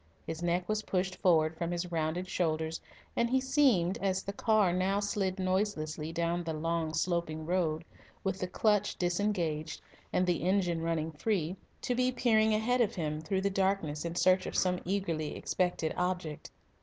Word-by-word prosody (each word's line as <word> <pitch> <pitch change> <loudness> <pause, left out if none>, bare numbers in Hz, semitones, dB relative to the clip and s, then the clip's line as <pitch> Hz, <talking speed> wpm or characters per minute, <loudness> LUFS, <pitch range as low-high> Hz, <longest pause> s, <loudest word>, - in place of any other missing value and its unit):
His 160 0 -5
neck 175 +1 0
was 215 0 0
pushed 185 -2 -1
forward 160 -4 +3
from 170 +1 -2
his 175 0 -3
rounded 165 +2 -1
shoulders, 160 -3 -1 0.3
and 235 0 +2
he 265 +2 +3
seemed, 255 - +3
as 190 -1 0
the 200 - -4
car 210 -3 +3
now 190 +2 +1
slid 200 -2 -1
noiselessly 185 -5 -1
down 170 +1 -1
the 165 -1 -3
long, 165 0 -1
sloping 170 -3 -1
road, 165 -2 0 0.4
with 190 -1 -1
the 185 - -2
clutch 210 +2 +1
disengaged 175 -4 -1 0.3
and 180 - +2
the 175 -3 +1
engine 180 -2 +1
running 165 -1 -1
free, 175 +1 -1 0.3
to 250 - 0
be 255 +1 +2
peering 220 -3 +3
ahead 245 +3 +2
of 230 0 +1
him 155 -3 -2
through 190 +4 -1
the 200 +1 0
darkness 190 -6 0
in 170 0 -4
search 185 +1 +3
of - - -5
some 180 -1 +2
eagerly 170 -5 -1
expected 175 -3 -1
object. 180 -4 -2
180 Hz, 170 wpm, -31 LUFS, 165-200 Hz, 0.4 s, forward